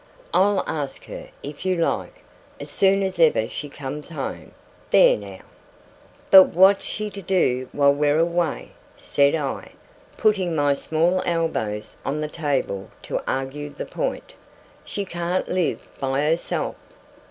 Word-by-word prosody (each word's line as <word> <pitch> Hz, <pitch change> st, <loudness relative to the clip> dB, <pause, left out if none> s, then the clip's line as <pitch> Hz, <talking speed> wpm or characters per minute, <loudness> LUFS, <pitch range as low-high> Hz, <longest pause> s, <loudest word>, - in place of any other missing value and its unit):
I'll 205 Hz, -, +3 dB
ask 145 Hz, -3 st, -4 dB
her, -, -, -9 dB
if -, -, -7 dB
you 185 Hz, -1 st, +1 dB
like, 170 Hz, -1 st, -2 dB, 0.4 s
as -, -, -7 dB
soon 195 Hz, 0 st, +3 dB
as 190 Hz, -2 st, -3 dB
ever 155 Hz, -9 st, +4 dB
she 145 Hz, -, -6 dB
comes 140 Hz, +1 st, -7 dB
home. 150 Hz, -5 st, -6 dB, 0.4 s
There -, -, +6 dB
now!' 100 Hz, -2 st, -9 dB, 0.9 s
'But 190 Hz, -1 st, +10 dB
what's 190 Hz, +2 st, +6 dB
she 210 Hz, -1 st, -3 dB
to 200 Hz, -, -8 dB
do 130 Hz, -10 st, +1 dB
while 140 Hz, -1 st, +4 dB
we're 145 Hz, +1 st, +2 dB
away?' 170 Hz, 0 st, 0 dB, 0.3 s
said 140 Hz, +1 st, +2 dB
I, 145 Hz, -4 st, -4 dB, 0.4 s
putting 190 Hz, -6 st, +2 dB
my 145 Hz, -2 st, +3 dB
small 165 Hz, +6 st, +1 dB
elbows 160 Hz, -11 st, -2 dB
on 145 Hz, +2 st, -2 dB
the 150 Hz, -, -2 dB
table 140 Hz, -, -2 dB
to -, -, -3 dB
argue 135 Hz, +3 st, -3 dB
the -, -, -7 dB
point. -, -, -4 dB, 0.5 s
'She 200 Hz, -, -4 dB
can't 175 Hz, 0 st, -2 dB
live 180 Hz, -3 st, -1 dB
by 135 Hz, +1 st, 0 dB
herself. 160 Hz, +3 st, -1 dB
160 Hz, 140 wpm, -23 LUFS, 140-185 Hz, 0.9 s, But